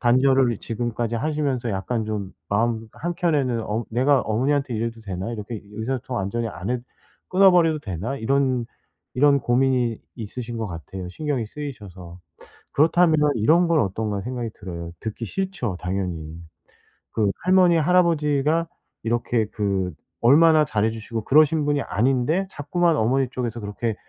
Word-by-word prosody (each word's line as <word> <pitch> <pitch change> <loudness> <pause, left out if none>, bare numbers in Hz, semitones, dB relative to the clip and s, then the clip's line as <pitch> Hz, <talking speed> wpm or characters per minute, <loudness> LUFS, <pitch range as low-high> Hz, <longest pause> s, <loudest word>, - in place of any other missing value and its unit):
단절을 130 -1 +3
지금까지 120 0 -3
하시면서 140 -3 -1
약간 110 +4 -2
좀 105 -3 -4 0.2
마음 110 +1 0
한켠에는 150 -9 0
어 110 +3 -2
'내가 130 +4 +3
어머니한테 130 +4 0
이래도 115 +1 -3
되나? 95 +2 -4
이렇게 110 0 -6
의사소통 125 +4 -3
완전히 115 +3 -2
안 100 +1 -5
해 125 - 0 0.5
끊어 190 +1 +6
버려도 165 -4 +3
되나?' 105 - -4
이런 130 0 +1 0.5
이런 140 +1 +4
고민이 125 -2 +1 0.2
있으신 120 +1 -6
것 110 - -2
같아요, 90 +2 -7
신경이 140 - -2
쓰이셔서. 100 - -9 0.5
그렇다면 160 +2 +4 0.2
이런 160 +11 +4
건 165 -3 +3
어떤가 100 0 -2
생각이 120 0 -4
들어요. 85 -2 -7
듣기 110 +2 -5
싫죠, 170 - -3
당연히. 90 -4 -4 0.7
그 105 -3 +2
할머니, 180 -1 +5
할아버지가 160 -2 +2 0.4
이렇게 120 0 0
그 100 -4 -1 0.3
얼마나 155 +5 +6
잘해 110 -6 +1
주시고 110 0 -5
그러신 155 +2 +4
분이 145 -1 +1
아닌데 130 - +1
자꾸만 165 +3 +1
어머니 130 +3 +1
쪽에서 120 -3 -3
그렇게 105 +2 -3
120 Hz, 340 characters per minute, -23 LUFS, 110-145 Hz, 0.7 s, 끊어